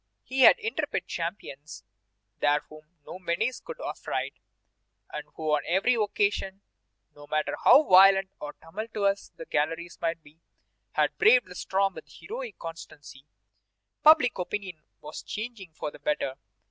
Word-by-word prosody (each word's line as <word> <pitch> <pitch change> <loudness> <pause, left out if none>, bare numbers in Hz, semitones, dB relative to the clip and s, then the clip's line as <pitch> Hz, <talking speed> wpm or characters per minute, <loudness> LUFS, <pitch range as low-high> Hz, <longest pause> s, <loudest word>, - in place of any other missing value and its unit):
He 260 +1 -4
had 260 - +8
intrepid 455 0 -3
champions 155 - -6 0.6
there 145 0 +3
whom 155 +2 -16
no 185 - -8
menace 190 +8 -1
could 485 - -9
affright, - - -4 0.8
and - - -6
who 155 -1 -2
on 150 -1 +3
every 190 +8 +3
occasion, 205 -3 0 0.5
no 145 0 -13
matter 155 0 -1
how 290 - +8
violent 195 -2 +6
or 150 0 -6
tumultuous 200 +2 -3
the 165 - -9
galleries 165 +4 -2
might 165 -1 -2
be, 150 +2 -20 0.5
had - - +1
braved 255 - +6
the - - -11
storm 195 +2 0
with - - -10
heroic 470 +1 -8
constancy. 150 -4 -10 0.7
Public 300 -9 +6
opinion 185 -3 -4 0.2
was 150 +1 -8
changing 215 -5 -7
for 150 - -5
the - - -14
better. 145 -2 -1
180 Hz, 140 wpm, -27 LUFS, 155-215 Hz, 0.8 s, had